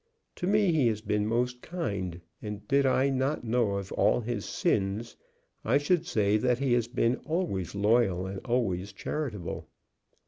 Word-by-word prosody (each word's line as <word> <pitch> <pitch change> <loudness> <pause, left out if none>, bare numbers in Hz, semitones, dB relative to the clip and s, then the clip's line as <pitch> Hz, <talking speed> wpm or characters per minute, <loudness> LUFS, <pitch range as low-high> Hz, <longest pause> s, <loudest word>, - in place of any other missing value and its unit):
To 180 - -2
me 205 -2 +4
he 145 -6 +3
has 110 -2 0
been 105 -1 0
most 125 +2 0
kind, 100 - -4 0.2
and 105 -1 -6
did 140 0 +3
I 130 +1 +3
not 135 +2 0
know 115 -3 +1
of 100 -1 -4
all - - +3
his 115 -2 -3
sins 100 +4 -1 0.5
I 125 +5 +3
should 170 +4 +1
say 105 - +2
that 125 +2 +2
he 135 -2 +1
had 120 +1 0
been 120 +1 +2
always 100 - -2
loyal 100 -3 +2
and 95 +1 -5
always 100 -6 -1
charitable. 110 - -4
115 Hz, 165 wpm, -29 LUFS, 100-130 Hz, 0.5 s, me